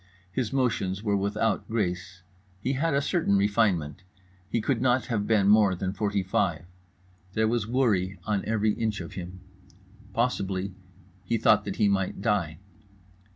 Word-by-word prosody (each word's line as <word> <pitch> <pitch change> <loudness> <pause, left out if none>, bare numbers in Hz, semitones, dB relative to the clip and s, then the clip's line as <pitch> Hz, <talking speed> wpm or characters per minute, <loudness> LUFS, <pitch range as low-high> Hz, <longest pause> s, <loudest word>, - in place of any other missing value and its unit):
His 120 +2 -2
motions 105 -7 0
were 105 -2 +1
without 100 +3 0
grace. 90 -4 -2 0.4
He 130 +7 -1
had 145 +2 0
a 140 - +2
certain 155 - +2
refinement. 100 -6 +1 0.5
He 115 - 0
could 120 +2 0
not 125 0 +2
have 105 -4 -1
been 105 -3 +3
more 105 -2 +5
than 95 +1 -3
forty 100 -1 -1
five. 95 -2 0 0.7
There 110 +1 +2
was 115 -2 0
worry 105 -7 +1
on 105 -2 0
every 110 -1 +1
inch 110 -2 -2
of 85 - -7
him. 90 0 -7 0.7
Possibly 100 -4 -1 0.5
he 115 - 0
thought 110 -1 +4
that 100 - -3
he 105 - +3
might 95 -2 0
die. 95 -7 0
105 Hz, 155 wpm, -27 LUFS, 95-115 Hz, 0.7 s, more